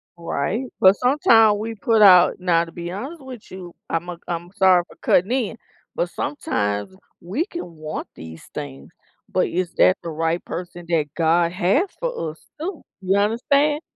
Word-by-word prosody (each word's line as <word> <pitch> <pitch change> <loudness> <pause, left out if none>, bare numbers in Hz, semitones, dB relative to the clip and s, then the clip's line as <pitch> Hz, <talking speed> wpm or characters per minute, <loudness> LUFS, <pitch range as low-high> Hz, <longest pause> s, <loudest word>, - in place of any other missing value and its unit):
Right, 170 - -2 0.2
but 190 +2 +7
sometimes 225 -5 +4
we 225 +1 -4
put 220 +1 +2
out 180 -3 +7
now 170 -2 +2
to 165 - -13
be 175 0 -6
honest 270 - -7
with 255 -7 -11
you, 180 -2 -9
I'm 165 +2 -2
a 175 - -6
I'm 170 0 -4
sorry 185 -3 +5
for - - -16
cutting 190 +7 +3
in, 240 -4 -1 0.4
but - - -1
sometimes 105 - -3 0.3
we 225 - -2
can 180 - -8
want 155 0 -6
these 80 0 -10
things, 145 -1 -7 0.4
but 185 - +2
is 175 0 -2
that 185 - +5
the 170 - -6
right 165 +2 -1
person 175 0 -7
that 165 -3 +2
God 170 +1 +2
has 205 - +1
for - - -3
us 160 - -17 0.2
too? 340 0 -5 0.2
You 190 +1 +1
understand? 280 +8 +2
185 Hz, 170 wpm, -22 LUFS, 170-230 Hz, 0.4 s, but